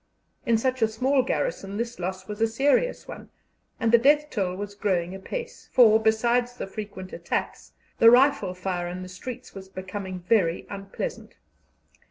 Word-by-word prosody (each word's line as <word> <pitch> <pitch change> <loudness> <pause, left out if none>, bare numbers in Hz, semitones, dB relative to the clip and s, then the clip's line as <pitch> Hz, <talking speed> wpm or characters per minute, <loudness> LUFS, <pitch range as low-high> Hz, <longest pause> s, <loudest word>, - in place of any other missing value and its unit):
In 230 -1 +4
such 255 +2 -1
a 225 - +5
small 260 +5 +2
garrison 250 - -2
this 235 -1 -4
loss 185 +1 -4
was 210 +1 -6
a 225 - +4
serious 275 - +1
one, - - -9 0.5
and 230 - +1
the 235 - +7
death 295 +4 +3
roll 185 -4 0
was 205 +1 -6
growing 185 -4 -1
apace, 470 - -7
for, 220 -3 +7
besides 240 +3 +1
the - - -4
frequent 195 -2 -8
attacks, - - -4 0.3
the 230 - +9
rifle 255 -6 +4
fire 180 -1 -3
in 180 +1 -5
the - - -8
streets 250 +7 -8
was 190 -1 -10
becoming 190 0 -6
very 180 -3 +1
unpleasant. 200 - -6
220 Hz, 165 wpm, -26 LUFS, 190-245 Hz, 0.5 s, the